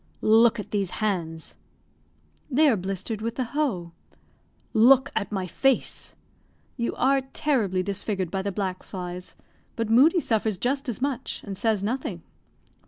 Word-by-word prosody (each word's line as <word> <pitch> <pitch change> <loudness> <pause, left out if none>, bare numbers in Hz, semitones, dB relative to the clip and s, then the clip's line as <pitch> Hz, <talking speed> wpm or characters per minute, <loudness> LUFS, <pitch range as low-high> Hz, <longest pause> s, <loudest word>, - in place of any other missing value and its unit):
"Look 225 +1 +5
at 210 - -7
these 200 -3 0
hands." 170 -7 -2 1.0
"They 300 +3 +4
are 260 - +4
blistered 195 +3 -4
with 230 +1 -3
the 260 - 0
hoe." 235 - -2 0.8
"Look 260 +4 +6
at 200 - -1
my 190 -3 -2
face." 260 - 0 0.6
"You 235 -2 -2
are 270 +1 +3
terribly 210 -11 +1
disfigured 195 -2 -2
by 195 - -1
the 200 +1 -2
black 185 -1 -3
flies. 180 -1 -7 0.4
But 225 -1 -2
Moodie 295 +10 +6
suffers 220 - 0
just 270 +6 -1
as 240 +2 -3
much, 270 -2 -3
and 200 -2 -6
says 210 0 0
nothing." 215 -6 -3
215 Hz, 145 wpm, -25 LUFS, 190-255 Hz, 1.0 s, Look